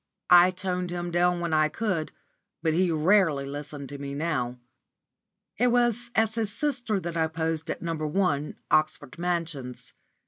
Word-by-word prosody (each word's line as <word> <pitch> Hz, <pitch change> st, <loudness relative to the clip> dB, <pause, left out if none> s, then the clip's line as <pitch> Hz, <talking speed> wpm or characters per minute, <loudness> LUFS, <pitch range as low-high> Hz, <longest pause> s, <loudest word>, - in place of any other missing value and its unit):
I 175 Hz, +1 st, +9 dB
toned 180 Hz, -1 st, -3 dB
him 175 Hz, 0 st, -4 dB
down 175 Hz, 0 st, +2 dB
when 170 Hz, -2 st, -2 dB
I 155 Hz, 0 st, +3 dB
could, 180 Hz, -4 st, -2 dB, 0.5 s
but 160 Hz, -1 st, +2 dB
he 180 Hz, +2 st, +2 dB
rarely 160 Hz, -3 st, +3 dB
listened 145 Hz, 0 st, -6 dB
to 140 Hz, 0 st, -8 dB
me 140 Hz, 0 st, -5 dB
now. 140 Hz, -6 st, -2 dB, 1.0 s
It 250 Hz, -, +4 dB
was 240 Hz, 0 st, +2 dB
as 220 Hz, 0 st, +2 dB
his 220 Hz, -2 st, -1 dB
sister 245 Hz, -6 st, 0 dB
that 170 Hz, -2 st, -5 dB
I 160 Hz, -1 st, +2 dB
posed 160 Hz, 0 st, -2 dB
at -, -, -4 dB
No. 165 Hz, -1 st, -1 dB
1, 155 Hz, -1 st, -1 dB, 0.2 s
Oxford 155 Hz, -2 st, +1 dB
Mansions. 165 Hz, -8 st, -3 dB
170 Hz, 160 wpm, -27 LUFS, 155-185 Hz, 1.0 s, I